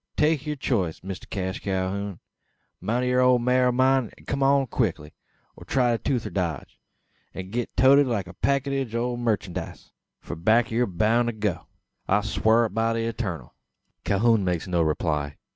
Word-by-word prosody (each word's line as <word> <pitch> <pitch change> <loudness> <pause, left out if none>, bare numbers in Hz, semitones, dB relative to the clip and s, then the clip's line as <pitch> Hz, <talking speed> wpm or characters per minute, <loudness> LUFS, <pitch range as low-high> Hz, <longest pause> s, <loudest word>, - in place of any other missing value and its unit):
Take 150 -1 +2
yur 150 - -1
choice, 100 - -2
Mister 95 -1 -7
Cash 95 -2 -3
Calhoun. 95 0 -3 0.6
Mount 120 +3 -1
thet 125 0 +2
old 125 -1 +4
maar 125 +1 +3
o' - - +3
mine, 130 -1 +2
an - - -19
kum 140 0 -2
along 135 0 +4
quickly; 90 - -2 0.4
or - - -12
try 125 -2 +1
the 115 - 0
toother 125 -4 -2
dodge, 85 -7 -3 0.6
an 95 0 -7
git 120 +1 -4
toated 140 +2 +6
like 110 -6 -1
a 90 - -11
packidge 135 0 -1
o' 120 +1 -1
merchandice: 105 -7 -3 0.3
for - - -7
back 110 +8 +2
yur 120 +2 +1
boun' 110 +6 +1
to 120 - -1
go 105 -5 -3 0.4
I 100 +2 +3
swar 110 +2 +2
it 110 - -5
by 115 +1 +1
the 115 - -1
Eturnal!" 95 - -5 0.5
Calhoun 110 +1 +2
makes 90 -1 -1
no 90 -2 +1
reply. 75 -2 -1
115 Hz, 175 wpm, -25 LUFS, 95-125 Hz, 0.6 s, toated